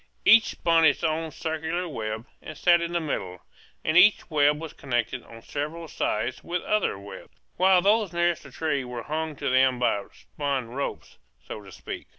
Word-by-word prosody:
Each 225 -1 +8
spun 165 -1 +2
its 150 0 +4
own 160 0 0
circular 160 +3 -3
web, 110 -6 -4 0.2
and 155 - -9
sat 175 +1 +4
in 170 0 -3
the 175 - 0
middle; 95 - -4 0.4
and 155 - +1
each 185 0 +5
web 150 0 +3
was 160 -1 -7
connected 125 -1 -2
on 115 -1 -14
several 155 +3 -5
sides 120 -3 -2
with 175 0 -3
other 215 - 0
webs, 100 +1 -11 0.2
while 185 0 +5
those 210 -1 +3
nearest 175 -1 +1
the 140 - -13
trees 140 -2 -2
were 120 -2 -6
hung 155 +2 -3
to - - -4
them 130 0 +4
by 110 -4 0
spun 140 -5 -4
ropes, 140 +4 -5 0.3
so 105 - -7
to 100 -1 -13
speak. - - -8
155 Hz, 180 wpm, -26 LUFS, 125-170 Hz, 0.4 s, Each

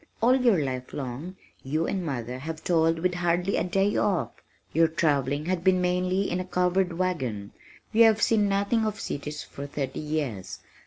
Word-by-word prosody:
"All 245 +4 +5
your 245 -6 +4
life 130 -1 -5
long 140 +7 -5 0.3
you 155 +5 -1
and 190 -2 -2
mother 125 -5 -4
have 160 +3 -6
toiled 165 -1 +2
with 180 +2 0
hardly 175 +2 0
a - - +1
day 195 +3 +1
off. 190 -4 +1 0.4
Your 165 0 +5
travelling 145 -3 0
has 185 0 0
been 185 +1 +3
mainly 180 +2 0
in 180 - 0
a 185 - -3
covered 180 0 +1
wagon. 130 - -2 0.4
You 230 +1 +6
have 220 -1 +4
seen 210 -3 +3
nothing 200 +3 +1
of 215 -1 -2
cities 150 +1 -5
for 140 +1 -8
thirty 140 -2 -4
years. 140 -12 -3
175 Hz, 175 wpm, -27 LUFS, 145-190 Hz, 0.4 s, You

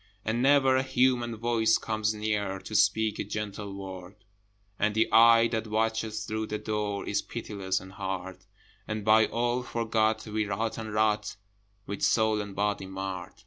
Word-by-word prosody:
And 110 +2 0
never 135 -1 +5
a - - +3
human 125 -3 +1
voice 115 -1 +2
comes 110 -1 -1
near 105 -2 -1
To 100 - -10
speak 110 0 +2
a - - 0
gentle 105 -1 -5
word: 95 -1 -8 0.6
And 105 0 +1
the 110 - +3
eye 115 0 +7
that 115 -1 -2
watches 110 0 -1
through 110 0 -3
the 105 - -3
door 105 -2 -3
Is - - 0
pitiless 95 -3 -3
and 95 - -12
hard: 95 -1 -5 0.5
And 110 -1 -4
by 110 0 +5
all 120 +1 0
forgot, 110 -2 0
we 110 -1 -2
rot 110 +3 -2
and 110 -1 -6
rot, 105 0 +1 0.5
With 100 - -6
soul 110 -1 +2
and 100 -2 -8
body 100 -1 -1
marred. 95 -1 -5
110 Hz, 165 wpm, -28 LUFS, 100-115 Hz, 0.6 s, eye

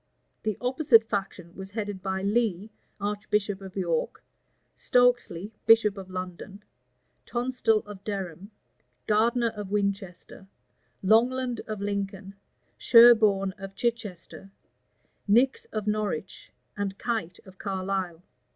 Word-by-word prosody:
The 215 -2 -2
opposite 250 -2 +4
faction 195 -4 -4
was 190 0 -8
headed 205 -2 -5
by 190 0 -3
Lee, 210 -1 0 0.3
archbishop 205 -1 -1
of 190 -1 -10
York, 170 -4 -2 0.5
Stokesley, 245 -6 +1 0.2
bishop 225 -3 +6
of 190 -2 -9
London, 185 +2 -7 0.6
Tonstal 240 -3 +1
of 205 -2 -11
Durham, 195 -2 -5 0.6
Gardner 230 +3 +2
of 210 -3 -7
Winchester, 200 -2 -3 0.6
Longland 240 +4 +2
of 215 -2 -5
Lincoln, 200 -1 -4 0.5
Sherborne 215 -5 +6
of 195 0 -8
Chichester, 205 -5 -4 0.8
Nix 245 +6 +3
of 215 -2 -5
Norwich, 210 -4 -3 0.2
and 200 -1 -3
Kite 220 -8 -3
of 190 -1 -16
Carlisle. 190 -3 -3
205 Hz, 105 wpm, -27 LUFS, 190-225 Hz, 0.8 s, bishop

